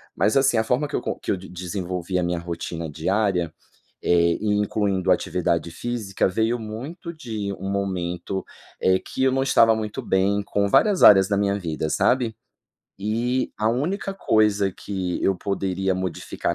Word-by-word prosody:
Mas, 110 - +2
assim 135 -3 +4
a 110 - +3
forma 125 +6 0
que 145 - -4
eu - - 0
co - - -3
que - - -8
eu 95 - 0
de 95 - -11
desenvolvi 90 0 -4
a 90 - 0
minha 85 0 -1
rotina 85 -1 -5
diária, 90 +1 0 0.5
eh 85 -1 +4
e 105 -1 +1
incluindo 100 -2 0
atividade 85 -1 0
física 110 0 -2
veio 110 +5 0
muito 135 +11 -7
de 110 -9 -4
um 95 0 -5
momento, 95 -1 -3 0.3
eh, 95 0 +3
que 130 - -4
eu 130 - +4
não 135 - +1
estava 115 -4 +5
muito 110 -1 -4
bem, 100 +2 +1
com 100 0 0
várias 205 - +4
áreas 95 -2 +8
da 100 - +1
minha 100 0 +1
vida, 80 -4 -3
sabe. 120 +4 +1 0.7
E 120 +5 0
a 110 +1 +2
única 180 - -2
coisa 105 - +2
que 95 -2 -4
eu 95 - +3
poderia 95 0 -1
modificar 95 -2 -3
100 Hz, 170 wpm, -23 LUFS, 90-110 Hz, 0.7 s, áreas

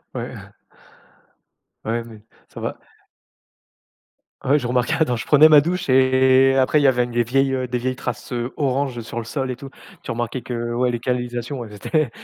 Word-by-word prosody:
Ouais. - - -5 1.5
Ouais, 115 +1 -1
mais 110 -2 -13 0.3
ça - - -10
va - - -4 1.7
Ouais, 140 +3 +4
je 125 -5 -2
remarquais, 125 0 +1
quand 125 -4 -1
je 115 - -6
prenais 150 +1 +7
ma 150 -2 +8
douche 175 +4 -3
et 130 0 +4
après 135 +3 +3
il 145 - +1
y - - +7
avait 125 -2 +3
des 120 0 0
vieilles, 135 +3 +1
heu, 130 -1 -2
des 125 0 -2
vieilles 130 +1 -2
traces, 125 -3 -6
heu, 120 0 -3
orange 135 -3 -1
sur 115 +1 -7
le 115 - -4
sol 130 +2 -3
et 125 - -4
tout. 140 +1 -10 0.4
Tu 115 - -3
remarquais 120 +1 -3
que, 120 -1 -4
ouais, 125 0 +1
les 120 - -3
canalisations, 125 +1 -3
elles 105 - -12
étaient 150 +6 -1
125 Hz, 190 wpm, -21 LUFS, 120-135 Hz, 1.7 s, ma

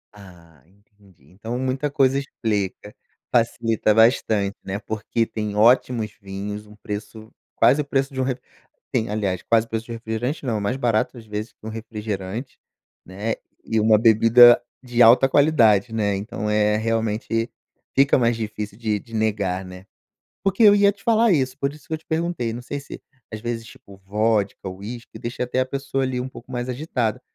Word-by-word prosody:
Ah, 85 -7 -16
entendi. 100 -1 -25
Então, 110 +6 -5
muita 130 +3 -1
coisa 135 -1 +2
explica, 105 -6 -3 0.4
facilita 115 -2 +2
bastante, 110 -3 +3
né, 95 +1 -4
porque 110 +2 -2
tem 105 -2 -4
ótimos 115 0 +3
vinhos, 100 +2 -6
um 105 - -15
preço 105 +2 -7 0.2
quase 140 +4 +4
o - - -5
preço 135 0 -1
de 130 - -2
um - - +1
re 130 -1 -1 0.6
tem, 110 - 0
aliás, 100 -4 -1
quase 115 0 +2
preço 115 0 -4
de - - -9
um - - -4
refrigerante, 115 +6 -4
não, 110 -4 -1
mais 100 +6 -1
barato 120 -1 0
às 115 - -11
vezes 105 +1 -5
que - - -18
um 110 - -4
refrigerante, 110 +1 -6 0.4
né, 100 +5 -3 0.3
e 110 - 0
uma 110 0 +5
bebida 115 +2 +7 0.2
de 120 -1 0
alta 120 +4 +7
qualidade, 125 -8 +4
né, 105 -3 0
então, 105 +1 -4
eh, 105 0 +2
realmente, 115 +1 -1 0.5
fica 140 +1 +5
mais 115 -1 +2
difícil 105 -2 -5
de 110 -3 -1
de 115 +3 -11
negar, 100 -4 -1
né. 90 +1 -11 0.6
Porque 195 +2 +1
eu 205 -2 +8
ia 200 0 +5
te 200 - -22
falar 230 0 +4
isso, 130 -4 0
por 140 0 -1
isso 150 - -17
que - - -10
eu - - -3
te 160 - -30
perguntei, 160 -8 -2
não 120 - -7
sei 140 +3 -5
se, 140 - -10 0.3
às 110 - -5
vezes, 115 -1 -4
tipo, 100 -3 -15
vodka, 105 +1 -1
whisky, 110 +5 -9
deixa 120 +1 -5
até 125 +1 -1
a 130 - +1
pessoa 135 0 -2
ali 130 -1 -2
um 130 - -5
pouco 130 -1 -13
mais 125 0 -3
agitada, 125 -5 -2
115 Hz, 180 wpm, -22 LUFS, 105-125 Hz, 0.6 s, eu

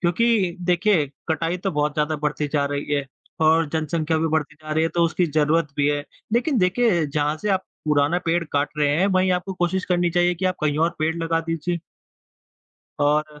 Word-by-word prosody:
क्योंकि 190 0 +2
देखिए 175 -2 +2 0.2
कटाई 165 +2 0
तो 195 +2 -2
बहुत 150 -1 0
ज़्यादा 155 0 0
बढ़ती 150 0 -2
जा 145 -2 +2
रही 145 0 -3
है 140 -1 -1 0.3
और 160 0 +4
जनसंख्या 160 0 -1
भी 165 - +1
बढ़ती 155 -1 -1
जा 155 0 -7
रही 160 - +2
है, - - +1
तो 170 +1 0
उसकी 175 +1 +1
ज़रूरत 155 +1 +1
भी 145 0 +2
है, 145 0 -1 0.3
लेकिन 245 +3 +2
देखिए 185 -3 +2
जहाँ 150 +1 -1
से 210 - -1
आप 190 -1 +1 0.2
पुराना 150 +3 +2
पेड़ 170 +1 +1
काट 145 0 +1
रहे 145 - +3
हैं, 190 +3 +3
वहीं 185 -1 +2
आपको 180 +2 -2
कोशिश 180 +1 -1
करनी 175 -1 +1
चाहिए 175 +1 +2
कि 185 - -5
आप 185 - +1
कहीं 150 0 0
और 165 +2 +3
पेड़ 160 +1 0
लगा 165 0 +1
दीजिए। 165 +1 -3 1.2
और 150 +1 +1
165 Hz, 200 wpm, -23 LUFS, 150-180 Hz, 1.2 s, और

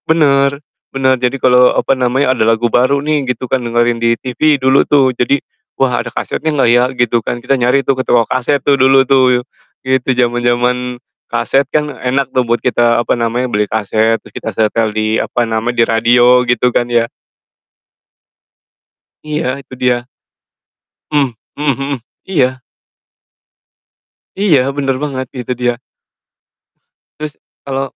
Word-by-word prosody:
Bener 140 -3 +3 0.3
bener, 130 -1 +2
jadi 125 +2 -2
kalo, 125 -1 +4
apa 135 - +1
namanya, 130 +1 +1
ada 110 - 0
lagu 115 +1 +2
baru 130 +4 +2
nih 150 0 -1
gitu 125 +1 -6
kan 130 0 -1
dengerin 120 0 +1
di 115 0 0
TV 145 +3 +1
dulu 130 +1 +3
tuh. 135 -4 +2
Jadi, 140 +4 +1 0.4
"Wah, 125 -3 +1
ada - - -7
kasetnya 160 +1 -3
nggak 145 -5 +1
ya?" 120 +1 +4
Gitu 120 -3 0
kan, 120 - -3
kita 125 +3 0
nyari 125 +1 +2
tuh 135 0 0
ke 130 - -2
toko 115 -3 +2
kaset 130 +3 0
tuh 140 +1 +2
dulu 135 0 +4
tuh, 130 -2 +3 0.5
gitu. 130 0 0
Zaman-zaman 120 0 0 0.3
kaset 120 +4 +1
kan 150 -2 -1
enak 130 +2 -2
tuh 130 - +3
buat 120 0 0
kita, 120 -1 +2
apa 120 - 0
namanya, 120 +2 -1
beli 105 -3 -1
kaset 110 +1 +1
terus - - -19
kita 110 - -5
setel 110 +1 0
di, 110 +1 -1
apa 120 +1 -1
nama, 110 +1 -1
di 120 -1 +1
radio, 120 +2 +4
gitu 125 0 0
kan - - +3
ya? 115 -1 +2 2.2
Iya, 150 0 -3 0.2
itu 135 -1 -16
dia. 125 -1 +1 1.0
Hmm 140 -4 +1 0.2
mhm 140 -2 -1
mhm. 140 -1 -3 0.3
Iya. 130 -8 0 1.8
Iya, 185 -9 +4 0.2
bener 135 -2 0
banget, 130 -3 -3
itu 125 0 -5
dia. 120 -1 -1 1.4
Terus, 150 -1 -5 0.3
kalo 135 -1 -2
125 Hz, 150 wpm, -14 LUFS, 120-135 Hz, 2.2 s, kalo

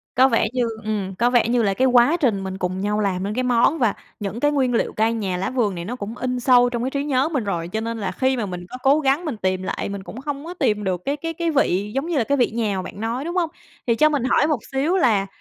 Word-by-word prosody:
có 260 +2 +6
vẻ 230 -3 +2
như 250 -2 +1 0.2
ừm, 200 -3 -3
có 235 +5 +2
vẻ 240 -2 +3
như 240 -1 +2
là 200 -2 +2
cái 260 +6 +1
quá 250 +6 +5
trình 225 - +1
mình 190 0 -5
cùng 185 +1 -2
nhau 210 +1 0
làm 190 -2 0
nên 205 +1 -2
cái 255 +2 -1
món, 250 +6 +3
và 230 -5 +2 0.3
những 205 +2 -4
cái 290 +3 +2
nguyên 260 -4 +1
liệu - - 0
cây 220 +1 +1
nhà 195 -5 -2
lá 190 - -2
vườn 230 -7 0
này 170 0 -5
nó 245 +4 -4
cũng 220 +1 -6
in 250 -1 -2
sâu 245 0 +5
trong 240 -1 -3
cái 260 - 0
trí 280 0 -1
nhớ 275 0 +1
mình 275 -8 -1
rồi. 170 -4 -2
Cho 220 +5 -3
nên 230 0 -3
là 195 -3 -3
khi 260 +5 0
mà 220 - -1
mình 180 -2 -6
có 255 - -7
cố 280 +3 +5
gắng 280 +4 +1
mình 280 -9 -3
tìm 185 -1 -1
lại - - -3
mình 200 -1 -6
cũng 240 +6 -9
không 285 +1 -5
có 345 - -6
tìm 210 -11 0
được 185 -2 -1
cái 280 +2 -1
cái 330 +2 -4
cái 335 0 -1
vị 205 - +1
giống 275 +5 -1
như 340 - -1
là 240 - +3
cái 280 +4 0
vị 245 - +2
nhà 220 -3 -1
mà 185 - -1
bạn 195 - -8
nói, 235 +5 -2
đúng 345 +2 -4
hông? 340 -3 +1 0.4
Thì 230 - +3
cho 305 +5 +4
mình 285 -5 0
hỏi 275 +3 +3
một 300 -7 +1
xíu 295 +8 +1
là, 210 - +2
235 Hz, 305 wpm, -22 LUFS, 200-275 Hz, 0.4 s, có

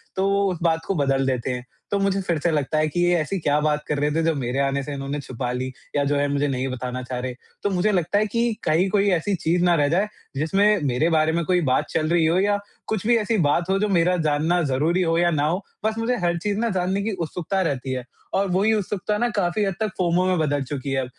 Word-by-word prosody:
तो 190 +1 +1 0.2
उस 175 - -4
बात 165 -1 +1
को 195 - -1
बदल 135 -2 +1
देते 130 0 -1
हैं। 125 0 -4 0.3
तो 200 - +2
मुझे 195 0 +1
फिर 170 -4 -1
से 170 +2 +1
लगता 150 0 0
है 155 0 +2
कि 175 - -3
ये 175 0 +3
ऐसी 190 +6 -2
क्या 150 -1 +1
बात 150 0 0
कर 150 - -1
रहे 150 +1 +1
थे 165 +2 +1
जो 165 0 +2
मेरे 130 0 -2
आने 140 0 +1
से 145 - -5
इन्होंने 140 +1 -4
छुपा 125 -2 -4
ली? 130 +1 -3 0.2
या 145 - +2
जो 145 +1 +1
है 145 0 +1
मुझे 145 +1 +1
नहीं 130 -1 -1
बताना 125 0 -4
चाह 125 0 -4
रहे 125 0 -3
हैं। 125 - -12 0.3
तो 205 - +1
मुझे 195 +2 +1
लगता 180 0 +1
है 215 - +2
कि 235 +1 0
कहीं 175 +5 +2
कोई 200 0 +2
ऐसी 195 +4 -1
चीज़ 175 +2 0
ना 175 -1 +4
रह 145 -3 +2
जाए 190 +6 +2 0.3
जिसमें 195 +7 +2
मेरे 140 +5 +1
बारे 160 -1 +3
में 170 +1 0
कोई 180 -1 +2
बात 130 - +2
चल 155 -1 0
रही 170 -1 +3
हो 170 +3 +3
या 205 +1 +2 0.3
कुछ 215 -2 -2
भी 240 -1 +5
ऐसी 220 +1 0
बात 170 +5 +1
हो 195 - +3
जो 210 - +1
मेरा 180 0 +3
जानना 160 +4 +2
ज़रूरी 165 +8 +1
हो 165 -1 +1
या 175 0 +3
ना 150 -1 +1
हो 180 +5 -1 0.2
बस 220 0 0
मुझे 230 +2 0
हर 170 0 +1
चीज़ 205 +3 -2
ना 235 - +1
जानने 190 +3 0
की 220 - -1 0.2
उत्सुकता 180 +4 -2
रहती 135 -6 -2
है। 125 - -3 0.3
और 195 +1 +2
वही 205 +4 +3
उत्सुकता 210 0 -1
ना 240 - +1
काफ़ी 205 -2 0
हद 195 -2 0
तक 215 -1 0
फोमो 180 0 +2
में 185 -1 +2
बदल 145 -3 0
चुकी 135 0 -5
है 135 -1 0
165 Hz, 265 wpm, -23 LUFS, 145-195 Hz, 0.3 s, भी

